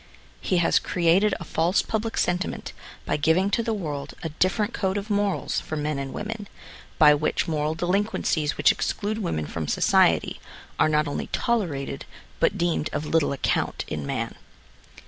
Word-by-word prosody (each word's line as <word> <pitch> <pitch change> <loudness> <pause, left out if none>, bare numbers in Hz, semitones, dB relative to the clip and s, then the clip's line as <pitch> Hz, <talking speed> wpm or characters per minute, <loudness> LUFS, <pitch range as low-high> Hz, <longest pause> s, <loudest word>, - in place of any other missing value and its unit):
He 185 - 0
has 170 - +4
created 180 +4 +2
a - - -6
false 170 +3 +1
public 225 +1 -2
sentiment 180 +1 -1 0.3
by - - 0
giving 160 +6 +2
to 230 - +2
the 230 - -2
world 150 -8 -5
a 160 - -2
dif 185 +7 +1
ferent 215 +2 0
code 190 0 -1
of 205 +2 -4
morals 205 -1 0
for 155 - -5
men 150 -1 -2
and 135 -1 -4
women, 210 0 -5 0.5
by 150 -2 +8
which 145 +1 0
moral 155 -1 -1
delinquencies 175 -4 0
which - - +5
exclude 215 +1 -2
women 80 - -2
from 80 +1 -4
society, - - +3 0.4
are - - +4
not 150 0 +2
only 145 - -3
tolerated, 155 - -1 0.3
but - - +2
deemed 170 -3 0
of 150 - -3
little 160 -1 +2
account 140 - -1
in 75 - -4
man. - - -3
170 Hz, 165 wpm, -25 LUFS, 150-205 Hz, 0.5 s, by